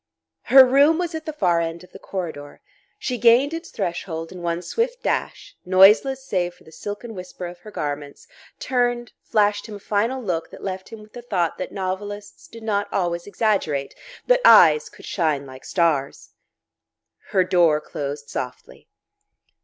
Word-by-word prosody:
Her 265 0 +9
room 280 +5 +4
was 350 -1 -2
at 320 0 -6
the - - -1
far 180 - +1
end 165 +1 -4
of 180 - -17
the - - -12
corridor. 160 -6 -6 0.4
She 250 -2 -3
gained 240 +6 +5
its 330 +1 -6
threshold 170 -3 -4
in 180 - -9
one 170 0 -2
swift 475 - -2
dash, - - -3
noiseless 210 +9 +5
save 175 -7 -1
for - - -22
the 160 - -16
silken 210 +6 -7
whisper 180 -1 -8
of 175 0 -8
her 215 - -12
garments, 145 -6 -5 0.3
turned, 245 -2 -1
flashed 205 0 +1
him 215 - -8
a - - -9
final 220 +6 -1
look 175 -9 -3
that - - -12
left 190 -1 -5
him 225 -2 -10
with 210 - -19
the 245 - -8
thought 180 -8 -1
that 185 - -4
novelists 205 +2 -5
did 230 -1 -12
not 205 -2 -1
always 175 -2 -1
exaggerate, 195 -11 -1 0.3
that - - +3
eyes 465 -2 +7
could - - -15
shine 155 -6 -1
like 130 -1 -12
stars.... 155 -6 -1 1.0
Her 190 -3 +3
door 175 -4 +3
closed 145 -1 -6
softly. 125 0 -7
195 Hz, 170 wpm, -22 LUFS, 170-240 Hz, 1.0 s, Her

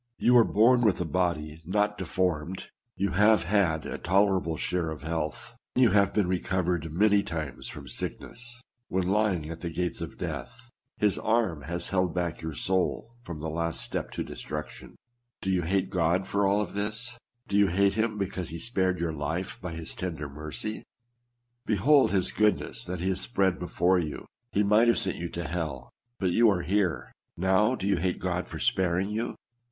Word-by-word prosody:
You 125 - +4
are 120 - +8
born 115 +4 +4
with 110 -5 +3
a 90 - -1
body 80 -2 -1
not 105 +4 +1
deformed; 90 -3 -2 0.3
you 100 -2 0
have 105 +4 +5
had 85 -4 +1
a - - -5
toler 95 +1 +3
able 80 -1 -3
share 90 -1 -1
of 80 -2 -7
health; 80 -1 -3 0.2
you 125 -4 +5
have 100 0 +4
been 105 - +2
recovered 90 -3 -1
many 100 +4 +4
times 80 -7 -5
from - - -8
sickness; 120 0 -5 0.3
when 95 -1 0
lying 95 -6 +1
at 85 - -7
the 85 - -4
gates 90 +2 -3
of - - -6
death, - - -6 0.3
his 105 -2 +2
arm 110 -9 +1
has 85 +2 -2
held 90 -3 +1
back 85 -2 -2
your 80 -2 -5
soul 95 +7 -1
from 85 -9 -7
the 80 - -3
last 85 0 -1
step - - -3
to - - -2
destruction. 75 +2 -7 0.4
Do 95 - -1
you 90 -1 +2
hate 95 +3 0
God 90 +1 +2
for 100 0 +1
all 105 +2 +2
this? 110 +5 -3 0.3
Do 100 - -2
you 100 -1 +5
hate 100 +2 +3
Mm 110 0 0
because 95 -3 -3
he 85 - -5
spared 95 -1 0
your 85 -1 -1
life 80 +5 -3
by 90 -2 -5
his 80 0 -6
tender 80 -5 -4
mercy? 75 +9 -5 0.9
Behold 135 +8 +5
his 95 -2 +1
goodness 105 +2 +1
that 90 -1 -4
he 95 - 0
hath 95 0 0
spread 95 -5 +1
before 90 +1 +2
you! 75 -4 -4 0.3
He 105 - +2
might 105 +3 +5
have 115 - +4
sent 95 - 0
you 85 0 -4
to 85 0 -4
hell; 80 -6 -4 0.3
but 95 -2 0
you 115 +5 +5
are 90 -4 +1
here. 90 -8 0 0.3
Now, 95 +7 +3
do 95 - -5
you 100 - +3
hate 90 +2 0
God 90 -1 -2
for - - -7
sparing 95 +2 +1
you? 115 +3 -2
95 Hz, 190 wpm, -28 LUFS, 85-105 Hz, 0.9 s, are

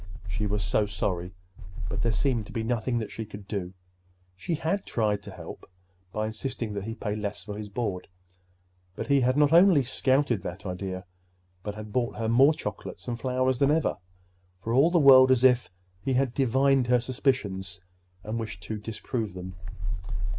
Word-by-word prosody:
She 95 +4 -2
was 105 0 -1
so 100 +4 +1
sorry!—but 90 -1 -5
there 115 - +2
seemed 115 -2 0
to - - -10
be 115 - -2
nothing 120 +1 0
that 110 -3 -3
she 115 - -5
could 105 -2 -10
do. 95 -3 -4 0.6
She 125 - -2
had 165 +6 -1
tried 105 -3 0
to - - -9
help - - -9 0.5
by 110 +2 -1
insisting 110 0 -4
that 100 -1 -4
he 115 0 -4
pay 105 -2 -3
less 105 -1 -4
for 105 -1 -6
his 105 0 -6
board; 100 -4 -3 0.9
but - - -4
he 140 -1 +3
had 130 +2 +2
not 150 +1 +4
only 170 -4 +7
scouted 130 -2 +1
that 90 +2 -7
idea, 95 0 -4 0.6
but 105 +2 -5
had 105 -1 -8
brought 120 -2 0
her 115 - -2
more 135 +7 +5
chocolates - - -6
and 120 -1 -3
flowers 130 0 +1
than 140 - +4
ever—for 90 - -3
all 140 +7 +5
the 175 - +2
world 130 -4 +8
as 130 -1 +4
if 125 -6 +5 0.3
he 130 - -1
had 130 -1 +1
divined 135 0 +3
her 125 0 +4
suspicions 105 -8 -1 0.4
and 110 +2 -3
wished 105 -5 -6
to 110 +3 -4
disprove 110 -1 -4
them. 90 0 -7
110 Hz, 175 wpm, -27 LUFS, 100-130 Hz, 0.9 s, world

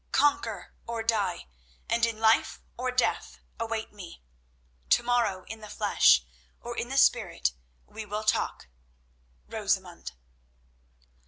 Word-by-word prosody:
Conquer 290 0 +1
or 230 -1 -3
die, 205 -6 0 0.4
and 230 0 +2
in 230 -1 -4
life 220 0 +3 0.2
or 255 +1 -2
death, 250 0 0 0.2
await 225 -1 -3
me. 185 - -11 0.7
To - - +4
morrow, 235 -6 +1
in 225 +3 -8
the 215 -1 -10
flesh, 65 - +4 0.3
or - - -7
in - - -3
the - - -2
spirit, - - +3 0.3
we 220 - -8
will 210 +1 -3
talk—Rosamund." 60 - -4
215 Hz, 115 wpm, -28 LUFS, -, 0.7 s, To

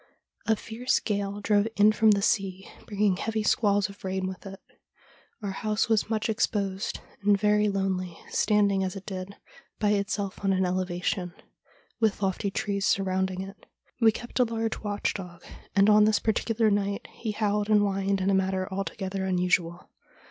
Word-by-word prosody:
A 220 - +4
fierce 230 +4 -1
gale 200 -1 -2
drove 205 0 +2
in 210 +1 +6
from 220 0 +4
the 200 -1 +3
sea, 195 -3 0 0.2
bringing 205 -3 +1
heavy 220 +1 -2
squalls 205 -1 +2
of 200 0 -14
rain 190 0 -2
with 190 +1 -6
it. 195 0 -9 0.8
Our 200 - -2
house 215 +3 -1
was 220 -1 +2
much 220 -1 0
exposed 205 -3 -1 0.2
and 200 0 +3
very 210 +1 +3
lonely, 190 -3 -2
standing, 200 -2 +2
as 185 0 -3
it 195 - -8
did, 190 0 -6 0.4
by 210 - +1
itself 200 -1 -2
on 195 -1 +2
an 190 0 +2
elevation, 180 0 -2 0.6
with 215 -3 +1
lofty 195 +2 0
trees 200 0 -1
surrounding 190 -1 0
it. 195 +1 -10 0.3
We 225 -2 +6
kept 240 +4 -6
a - - +7
large 225 -1 -2
watch 205 -1 -2
dog, 180 -3 -8 0.3
and 200 0 +5
on 210 0 +6
this 215 0 +3
particular 220 0 +1
night 200 0 -1
he 225 - -6
howled 210 0 0
and 210 -1 +5
whined 195 -1 0
in 190 +1 +2
a - - +2
manner 190 -1 0
alto 195 +1 -3
gether 190 -1 -3
unusual. 180 -2 0
200 Hz, 170 wpm, -27 LUFS, 190-210 Hz, 0.8 s, a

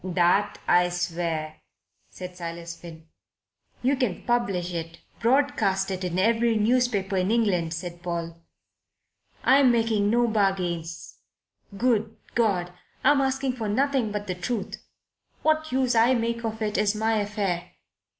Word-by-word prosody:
"That 185 +3 +2
I 180 0 +4
swear," 165 -3 -3 0.5
said 180 -1 -9
Silas 170 -1 -6
Finn. 165 -2 -12 0.8
"You 265 +3 +3
can 250 -9 -2
publish 195 -8 0
it 165 0 -5 0.2
broadcast 230 -7 +2
in 180 -2 -3
every 230 +3 +3
newspaper 215 -4 +1
in 185 +1 +1
England," 190 -8 +1
said 175 +1 -7
Paul. 170 -1 -4 1.1
"I'm 265 -1 +6
making 225 -3 +2
no 240 +2 +3
bargains. 180 -6 -1 0.6
Good 225 -2 +1 0.2
God! 185 -6 +1 0.3
I'm 280 +1 +5
asking 265 -1 0
for 220 -3 -3
nothing 265 0 +1
but 205 0 -3
the 185 - -2
truth. 195 +4 -4 0.6
What 310 0 +1
use 255 -1 +1
I 235 +3 +4
make 235 0 -1
of 220 0 -3
it 210 -1 -1
is 210 0 +2
my 220 +1 +1
affair. 200 -4 -2
205 Hz, 130 wpm, -26 LUFS, 175-235 Hz, 1.1 s, I'm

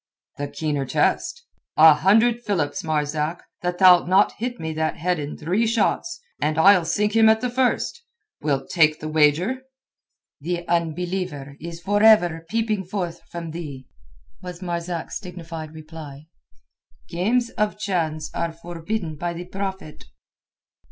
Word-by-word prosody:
"The 145 - -2
keener 145 -1 -2
test. 475 - 0 0.3
A 160 0 +9
hundred 220 +9 +3
philips, 190 -5 -1
Marzak, 155 +1 -1 0.2
that 180 0 -2
thou'lt 180 -2 +7
not 190 +3 +4
hit 245 +1 -3
me 160 0 -4
that 155 0 -1
head 180 +1 0
in 145 0 -5
three 185 +9 0
shots, 230 - 0 0.2
and 155 0 0
that - - +4
I'll 190 -2 +6
sink 210 +5 0
him 220 -1 +6
at 220 0 +4
the 250 0 -2
first! 260 - 0 0.4
Wilt 140 -3 -1
take 155 -3 +4
the 155 - -5
wager?" 160 - +2 0.8
"The 175 +3 -4
unbeliever 170 -3 -2
is 170 0 -7
for 205 +4 0
ever 175 -7 +5
peeping 220 -3 0
forth 180 -2 -4
from 170 -2 -6
thee," 145 -6 -7 0.6
was 180 -1 -8
Marzak's 170 -1 -4
dignified 165 -4 -8
reply. 155 -2 -10 0.8
"Games 230 +8 0
of 210 0 -1
chance 160 -7 -2
are 170 0 -2
forbidden 170 +1 -5
by 175 +2 -3
the 175 +1 -7
Prophet." 190 -4 -6
175 Hz, 145 wpm, -23 LUFS, 155-200 Hz, 0.8 s, A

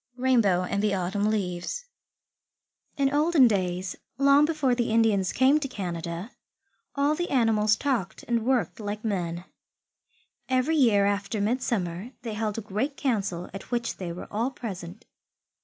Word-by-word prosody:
RAINBOW 230 -8 +3
AND 200 +2 -1
THE 205 -2 +1
AUTUMN 195 +3 0
LEAVES 200 - -2 1.1
In 275 -1 +2
olden 300 -3 +5
days, 185 -3 -1 0.2
long 280 +2 +5
before 300 -5 +1
the 240 -1 0
Indians 220 -4 +2
came 270 +4 +4
to 285 - -3
Canada, 175 -2 -5 0.6
all 285 +2 +2
the 350 +3 -2
animals 220 -4 +3
talked 240 -9 -2
and 235 -2 +1
worked 250 -1 0
like 210 +1 -5
men. 175 -4 -2 1.0
Every 260 +5 +2
year 225 -9 +4
after 200 +1 -1
midsummer 210 -2 -1
they 230 -3 -4
held 210 0 -2
a - - -2
great 220 +8 -3
council 195 -9 -1
at 195 - -8
which 235 -1 -2
they 180 -3 -5
were 170 - -7
all 225 +5 0
present. 205 -5 -8
220 Hz, 145 wpm, -26 LUFS, 190-260 Hz, 1.1 s, olden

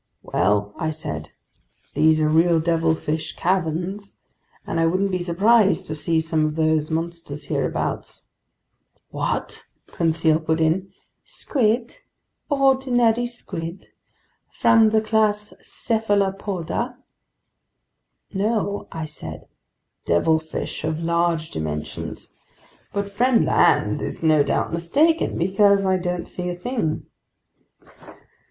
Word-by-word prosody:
"Well," 105 +3 +1
I 160 - -1
said, 155 0 -5 0.6
"these 155 0 +4
are 155 - +3
real 165 +2 +4
devilfish 160 -1 0
caverns, 185 +3 -2 0.5
and 165 - -2
I 165 - +3
wouldn't 190 +3 +1
be 185 - 0
surprised 195 +5 +3
to 155 - -4
see 160 +2 0
some 160 -1 0
of 155 0 -1
those 155 -1 +1
monsters 165 -2 -4
hereabouts." - - -2 0.9
"What!" - - -3 0.3
Conseil 160 -1 +2
put 160 0 -1
in. 170 +4 +1 0.3
"Squid, 235 -2 -1 0.5
ordinary 255 -4 +3
squid 180 -7 -6 0.6
from 225 -2 +4
the 220 0 +3
class 215 -1 +1
Cephalopoda?" 205 +1 -1 1.4
"No," 205 0 -1
I 160 -1 -4
said, 80 - -7 0.6
"devilfish 160 - 0
of 155 0 -1
large 170 -1 0
dimensions. 75 -1 -5 0.6
But 200 0 -2
friend 235 +4 +2
Land - - +3
is - - -5
no 155 -2 +5
doubt 145 - 0
mistaken, 290 - +2
because 195 +2 +3
I 190 0 +3
don't 180 -1 -3
see 180 0 -4
a 175 - -3
thing." 200 -5 -2
175 Hz, 105 wpm, -22 LUFS, 160-210 Hz, 1.4 s, no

